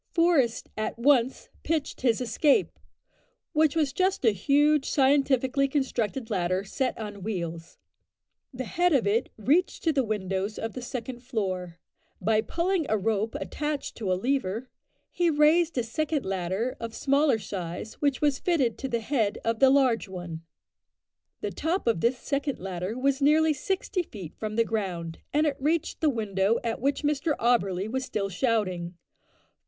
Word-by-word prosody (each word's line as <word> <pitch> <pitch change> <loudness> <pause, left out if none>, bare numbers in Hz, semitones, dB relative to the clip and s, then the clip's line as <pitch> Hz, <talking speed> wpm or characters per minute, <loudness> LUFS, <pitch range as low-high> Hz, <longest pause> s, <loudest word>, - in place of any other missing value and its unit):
Forest 330 -9 +2
at 215 +1 -3
once 255 0 +2
pitched 315 -3 -2
his 245 -2 +2
escape 275 - +2 0.7
which 310 -1 +3
was 300 -4 +1
just 370 -3 +1
a 225 - +6
huge 290 +8 +2
scientifically 275 -1 +3
constructed 255 -4 -2
ladder, 185 -1 0
set 255 +6 -2
on 205 -2 -6
wheels. 170 -5 -5 0.7
The 260 -1 -5
head 350 +8 +1
of 260 -6 +3
it 215 +4 +1
reached 295 - +1
to 320 - +2
the 270 -2 +2
windows 200 -1 -2
of 225 - -4
the 255 - -6
second 250 0 -5
floor. 190 -8 -3 0.4
By 220 0 +2
pulling 340 - -1
a 220 - +2
rope 215 +1 -1
attached 300 -1 -3
to 205 -5 -2
a - - +3
lever, 245 0 -1 0.4
he 350 -1 +2
raised 315 +1 +3
a 245 - +2
second 300 +5 -2
ladder 195 +6 -2
of 230 -1 -6
smaller 280 -2 +3
size, 190 0 -5
which 285 -3 +1
was 290 -3 +2
fitted 280 -10 +1
to 270 - -3
the 235 -3 -1
head 220 -4 0
of 230 -1 0
the 270 - +7
large 260 -5 +3
one. 175 -3 -6 1.0
The - - -2
top 340 +5 -1
of 230 -8 +1
this 245 +2 +2
second 280 +2 -2
ladder 185 +3 -4
was 275 +2 +1
nearly 310 +2 +4
sixty 375 +5 -2
feet 195 - -9
from 215 -1 -4
the 230 0 +3
ground, 180 -7 -3
and 300 +2 +2
it 285 -3 0
reached 315 +3 0
the 315 - +4
window 210 -3 +1
at 225 -1 -2
which 280 +3 0
Mr 295 +1 0
Auberly 200 -5 +1
was 260 +4 -2
still 210 -6 -2
shouting. 185 -5 -1
245 Hz, 160 wpm, -27 LUFS, 210-285 Hz, 1.0 s, the